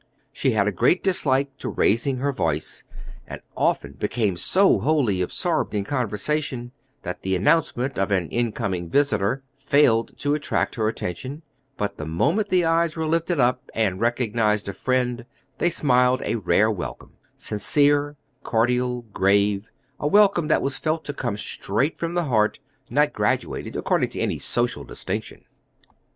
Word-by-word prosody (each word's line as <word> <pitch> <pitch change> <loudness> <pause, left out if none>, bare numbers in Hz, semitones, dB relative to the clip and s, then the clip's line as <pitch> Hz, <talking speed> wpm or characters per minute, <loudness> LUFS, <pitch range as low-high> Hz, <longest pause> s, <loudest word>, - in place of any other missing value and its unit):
She 130 - +1
had 105 -2 +2
a - - +2
great 175 - +2
dislike 140 -7 +1
to - - -4
raising 130 +5 +1
her 140 +3 0
voice, - - -2 0.4
and - - -7 0.2
often 70 - 0
became 105 -3 0
so 190 - +3
wholly 130 -12 +1
absorbed 90 - -1
in 100 - 0
conversation 125 +2 -2 0.3
that 90 - -5
the 95 0 0
announcement 130 - +1
of 95 - +1
an 95 -4 +1
in 120 -1 0
coming 90 -5 -3
visitor 135 - +1
failed 135 -4 +2
to 145 0 0
attract 150 0 -1
her 110 -2 0
attention; 130 - -5 0.3
but 105 0 -3
the 75 - -6
moment 170 - +1
the 180 -2 +3
eyes 165 -1 +2
were 160 -1 -2
lifted 165 +1 0
up, 125 0 +1
and 100 -4 0
recognized 115 -3 +1
a 100 - -3
friend, 125 +3 -1 0.4
they 175 - +3
smiled 125 -5 +2
a - - 0
rare 105 0 +2
welcome 80 - -6 0.2
sincere, 145 +7 +1 0.3
cordial, 125 +1 0
grave 100 +2 +2 0.3
a 145 - -1
welcome 200 -2 +4
that 155 - +2
was 135 -1 -2
felt 160 0 -1
to 145 - -4
come 120 -7 -3
straight 110 +8 -2
from 170 +1 -3
the 175 - +1
heart, 110 -7 +1 0.3
not 145 +4 +2
graduated - - -1
according - - +1
to - - -7
any - - -1
social 120 0 -1
distinction." - - -6
125 Hz, 155 wpm, -23 LUFS, 105-145 Hz, 0.4 s, welcome